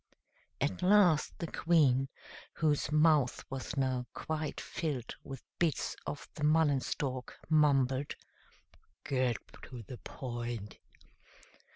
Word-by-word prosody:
At 140 +6 -1
last 180 -5 +4
the 170 - -3
Queen, 145 -6 +3 0.4
whose 150 -2 +1
mouth 150 -4 +3
was 135 +2 -4
now 130 -2 0
quite 155 -1 -3
filled 145 -7 -3
with 135 -2 -8 0.2
bits 170 -4 +1
of 145 0 -5
the 150 - -6
mullen 150 -2 +4
stalk, 130 -1 -3
mumbled, 140 -3 +3 0.9
"Get 130 -3 +1 0.3
to 125 -3 -9
the 120 +3 -9
point." 120 -5 -5
140 Hz, 105 wpm, -32 LUFS, 130-155 Hz, 0.9 s, last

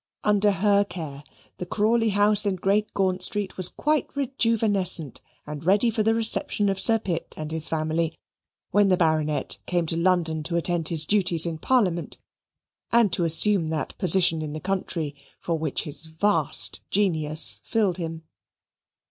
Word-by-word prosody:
Under 210 0 +2
her 200 +1 +2
care 155 -8 -8 0.4
the 180 - -4
Crawley 225 +1 +1
House 205 +1 +4
in 195 - 0
Great 200 +3 0
Gaunt 185 -1 0
Street 205 -4 +2
was 185 -2 +4
quite 305 -1 -1
rejuvenescent 215 - 0 0.2
and 150 0 -8
ready 205 +7 +3
for 220 0 -1
the 225 +1 +1
reception 220 -2 0
of 195 -1 -2
Sir 225 +2 +4
Pitt 185 -6 -5
and 155 0 -6
his 160 -1 -1
family, 160 +1 -2 0.5
when 205 0 +3
the 185 - +3
Baronet 155 -3 0
came 175 -2 0
to 165 - -3
London 170 -2 0
to 170 +3 -3
attend 170 -1 0
his 160 -2 +2
duties 180 -4 +2
in 165 -2 -4
Parliament 185 -7 0 0.7
and 230 -5 +3
to 175 - +1
assume 165 +1 +3
that 160 -1 -4
position 175 -3 +3
in 150 -1 -6
the 155 - -5
country 175 -5 -3 0.3
for 165 -2 -3
which 155 -3 -2
his 150 +2 -7
vast 160 -1 +1
genius 160 -6 +1
fitted 205 -6 0
him. 165 -2 -6
180 Hz, 160 wpm, -24 LUFS, 160-205 Hz, 0.7 s, House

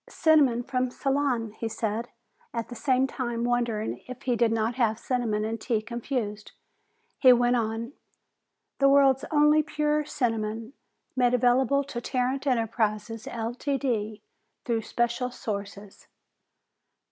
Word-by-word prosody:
"Cinnamon 285 -7 +3
from 255 0 -1
Ceylon," 270 -4 -1
he 225 +1 -5
said, 220 +1 -2 0.5
at 230 -1 -3
the 245 - -7
same 260 +1 +2
time 240 -3 -3
wondering 240 -3 -1
if 255 +1 -9
he 250 -2 +1
did 235 -1 +2
not 225 +1 0
have 230 -3 +1
cinnamon 230 -4 -1
and 225 0 -4
tea 225 -3 0
confused. 225 -2 -4 0.7
He 255 - +8
went 245 0 +3
on, 230 +2 -2 0.9
"The 275 0 +5
world's 275 -1 +4
only 300 0 +5
pure 300 0 0
cinnamon, 225 -4 -2 0.4
made 250 -1 +3
available 255 +3 +3
to 250 -3 -6
Tarrant 260 +3 -1
Enterprises, 225 -2 -1
Ltd., 235 -2 -2 0.4
through 230 -2 0
special 240 +2 -1
sources." 200 -3 -7
240 Hz, 125 wpm, -27 LUFS, 225-265 Hz, 0.9 s, He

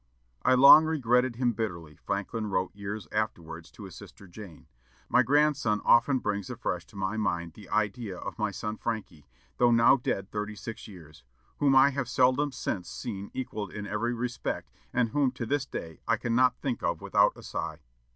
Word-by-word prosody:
"I 130 - +4
long 140 +4 +9
regretted 125 -5 +1
him 120 -1 +1
bitterly," 85 -8 -5
Franklin 105 +3 -3
wrote 95 -2 -1
years 100 +1 -6
afterwards 85 -6 -4
to - - -11
his 95 -5 -10
sister 100 - -13
Jane. 90 -2 -12 0.4
"My 125 - +5
grandson 140 -4 +2
often 125 +4 +5
brings 100 -5 -3
afresh 100 -8 -4
to 115 - -19
my 100 +2 -2
mind 85 -6 -2
the 100 0 -14
idea 105 -1 -1
of - - -7
my 105 -1 +1
son 105 +2 -5
Franky, 100 -10 -5 0.3
though 120 - +4
now 115 +3 +5
dead 100 -5 -3
thirty 105 0 -4
six 115 +2 -8
years; 80 - -14 0.4
whom 140 -2 +3
I 135 +1 +6
have 135 -3 -3
seldom 130 +4 +2
since 95 -7 -4
seen 100 -4 -6
equalled 110 -7 -4
in 105 -1 -6
every 115 +4 -2
respect, 120 +1 -4 0.2
and 120 -2 +1
whom 140 +2 +2
to 125 -2 -5
this 140 +2 -1
day 80 -2 -7
I - - +2
cannot 125 +1 +2
think 130 -4 -3
of - - -1
without - - +3
a - - -12
sigh." 80 0 -5
110 Hz, 180 wpm, -28 LUFS, 100-125 Hz, 0.4 s, long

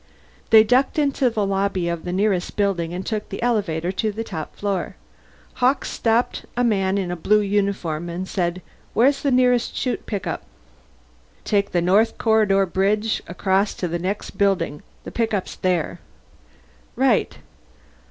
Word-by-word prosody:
They 220 -1 +8
ducked 250 +7 +2
into 280 -3 +2
the 215 -3 -1
lobby 195 -2 0
of 170 -1 -3
the 175 - -3
nearest 190 -1 0
building 190 -5 0
and 180 +2 -5
took 215 -1 -3
the - - -6
elevator 185 -8 0
to 215 +3 -1
the 220 +2 -4
top 160 -8 -6
floor. 200 -3 -2 0.7
Hawkes 260 +3 +2
stopped 230 +1 0
a 245 - +2
man 195 -4 +1
in 185 -3 -2
a - - -2
blue 210 +5 +3
uniform 195 -5 -1
and 180 +2 -4
said, 180 -1 -2 0.3
"Where's 270 +5 +3
the 285 - +1
nearest 250 -2 +2
Shoot 250 - -2
pickup?" 200 -4 -3 1.0
"Take 200 -1 +1
the 175 -1 +1
North 205 +6 +3
Corridor 210 -3 +3
bridge 205 +4 0
across 190 +3 0
to 180 - -3
the 170 +1 -3
next 190 +4 -3
building. 185 -7 +1 0.2
The - - -8
pickup's 220 -5 -1
there." 180 -4 -1 1.0
"Right." - - +2
200 Hz, 150 wpm, -22 LUFS, 180-220 Hz, 1.0 s, They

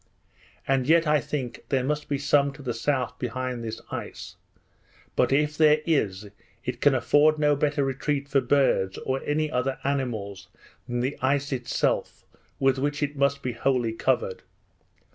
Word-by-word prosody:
And 135 -1 +1
yet 165 +1 +5
I 150 0 +3
think, 130 -1 -5
there 135 -3 +1
must 150 +3 -2
be 140 - 0
some 140 0 +2
to 140 - -12
the 125 -2 -2
south 125 +1 -1
behind 125 0 -3
this 110 0 -5
ice; - - -7 0.8
but - - +2
if 150 +2 +2
there 155 0 +5
is, 105 - 0 0.4
it - - -4
can 145 -2 +5
afford 145 +5 +4
no 150 -1 +3
better 145 0 +1
retreat 140 +1 -2
for 135 0 +2
birds, 115 -11 +2
or 130 0 -1
any 155 +1 0
other 130 0 -1
animals, 110 -9 -3 0.4
than 120 -1 -2
the 130 +3 -2
ice 140 +2 +1
itself, 125 -2 -1 0.3
with 135 -1 +2
which 145 +2 -1
it 145 0 -2
must 140 0 +1
be 125 - -1
wholly 120 -1 0
covered. 475 - 0
135 Hz, 160 wpm, -26 LUFS, 125-145 Hz, 0.8 s, yet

